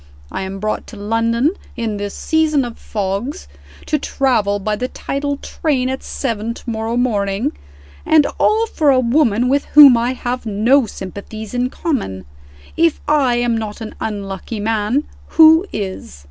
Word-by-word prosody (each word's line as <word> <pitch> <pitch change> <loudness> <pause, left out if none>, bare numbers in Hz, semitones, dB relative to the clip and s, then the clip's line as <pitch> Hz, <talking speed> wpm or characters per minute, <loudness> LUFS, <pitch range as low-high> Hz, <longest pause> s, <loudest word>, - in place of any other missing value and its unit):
I - - -4
am 190 0 -5
brought 215 +2 -3
to - - -10
London 230 +6 +1 0.2
in 225 -3 -3
this 205 0 -5
season 310 -4 +1
of 235 -1 -8
fogs, 210 - -4 0.4
to 300 - 0
travel 235 -8 +1
by 210 +1 -2
the 250 +4 -3
tidal 285 +2 -3
train 270 -4 -1
at 265 0 -3
seven 230 -3 -3
to - - -14
morrow 225 0 -2
morning 205 -4 0 0.5
and 310 -2 +4
all 440 +1 +3
for 315 -9 +1
a 265 -2 +5
woman 245 -2 +2
with 280 +2 +1
whom 285 -4 +8
I 235 +2 0
have 250 0 -4
no 230 +5 +3
sympathies 205 +3 -8
in 250 0 0
common. 230 - -3 0.5
If 330 -1 +2
I 285 -5 +3
am 240 -1 +1
not 220 -1 -4
an 220 -1 -7
unlucky 200 0 -4
man 220 +5 0 0.3
who 320 +3 +7
is?" 190 - -5
235 Hz, 160 wpm, -18 LUFS, 210-275 Hz, 0.5 s, whom